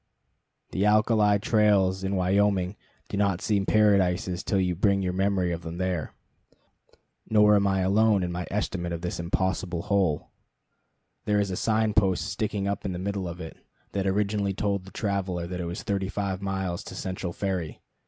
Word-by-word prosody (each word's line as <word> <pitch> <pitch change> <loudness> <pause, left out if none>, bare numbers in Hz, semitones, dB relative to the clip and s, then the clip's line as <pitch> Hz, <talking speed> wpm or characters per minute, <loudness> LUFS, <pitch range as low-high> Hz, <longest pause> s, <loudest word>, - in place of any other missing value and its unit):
The 95 - 0
alkali 105 0 +4
trails 100 -3 +2
in 95 +1 -1
Wyoming 95 0 +2 0.3
do - - -4
not 100 -3 +1
seem 100 -2 0
paradises 95 -4 +3
till 100 - 0
you 90 -1 +1
bring 100 +2 +2
your 90 -1 -1
memory 95 -1 +1
of 85 -1 -3
them 85 +1 -7
here. 90 -4 -2 1.1
Nor 105 -1 +6
am 100 -1 +3
I 95 -1 +1
alone 100 +1 +3
in 90 - -2
my 90 0 -4
estimate 90 -4 -2
of 85 - -4
this 90 0 -4
impossible 90 0 -1
hole. 100 -7 0 0.9
There 105 -1 +2
is 100 -2 0
a - - -2
sign 110 +1 +1
post 95 -4 +2
sticking 100 -1 -2
up 100 - -2
in 95 - -3
the - - -4
middle 95 0 -3
of 85 +1 -7
it, 80 -3 -8 0.3
that 100 -1 -1
originally 100 0 0
told 100 -2 -1
the 95 - -12
traveler 95 -4 -2
it 90 +1 -4
was 85 +2 -5
thirty 100 -3 -1
five 100 -2 -3
miles 95 -3 -3
to - - -8
Central 95 -1 -4
Ferry. 90 -4 -3
95 Hz, 175 wpm, -26 LUFS, 90-100 Hz, 1.1 s, Nor